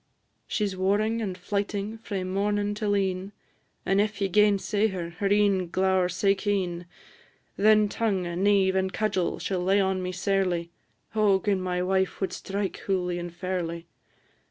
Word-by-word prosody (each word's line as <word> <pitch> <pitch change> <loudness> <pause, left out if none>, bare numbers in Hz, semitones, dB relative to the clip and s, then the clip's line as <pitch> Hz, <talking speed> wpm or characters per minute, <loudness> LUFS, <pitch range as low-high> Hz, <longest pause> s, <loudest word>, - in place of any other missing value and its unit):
She 210 - 0
's 195 -2 -3
warring 210 +4 +1
and 190 -4 -3
flyting 205 +3 -3
frae 200 -4 -4
mornin' 205 +2 0
till 205 -1 0
e'en, 190 0 -2 0.5
And 195 +1 +3
if 215 +1 -2
ye 195 -1 0
gainsay 210 +1 +3
her, 180 -4 -4
her 185 +4 -2
een 200 -3 +2
glower 190 0 +2
sae 190 +2 +2
keen; 185 -4 -2 0.7
Then 215 +1 +5
tongue, 205 -3 -1
neive, 190 +2 +2
and 190 0 +1
cudgel, 200 -4 -1
she - - -4
'll 180 -1 0
lay 195 +2 +3
on 190 -1 +1
me 180 0 -3
sairly. 180 -3 0 0.4
O 210 -3 +3
gin 195 -2 0
my 180 -1 -1
wife 190 0 0
wad 190 - -2
strike 200 0 -3
hooly 180 -2 -1
and 175 0 -5
fairly! 175 -1 -4
195 Hz, 160 wpm, -27 LUFS, 185-205 Hz, 0.7 s, Then